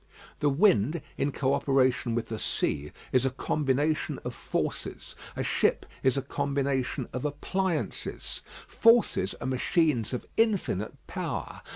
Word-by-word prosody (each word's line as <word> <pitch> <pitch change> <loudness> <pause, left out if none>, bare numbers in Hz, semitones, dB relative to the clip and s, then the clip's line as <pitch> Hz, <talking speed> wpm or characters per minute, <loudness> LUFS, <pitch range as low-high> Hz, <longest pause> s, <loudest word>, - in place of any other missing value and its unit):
The 145 - +3
wind 145 - +4 0.2
in 145 - 0
co 135 0 +1
operation 130 -4 +2
with 120 - -2
the 110 -1 -3
sea 75 +1 -1 0.2
is 130 -1 +4
a 135 - +3
combination 145 +3 0
of - - -3
forces. - - -3 0.2
A - - -1
ship - - +2 0.2
is 130 +1 +3
a 135 - 0
combination 140 -2 -1
of 125 - -3
appliances. 165 +4 -2 0.3
Forces 230 - +4
are - - -7
machines 130 - +2
of 125 - -3
infinite 200 - +1
power. - - -4
135 Hz, 135 wpm, -28 LUFS, 125-155 Hz, 0.3 s, wind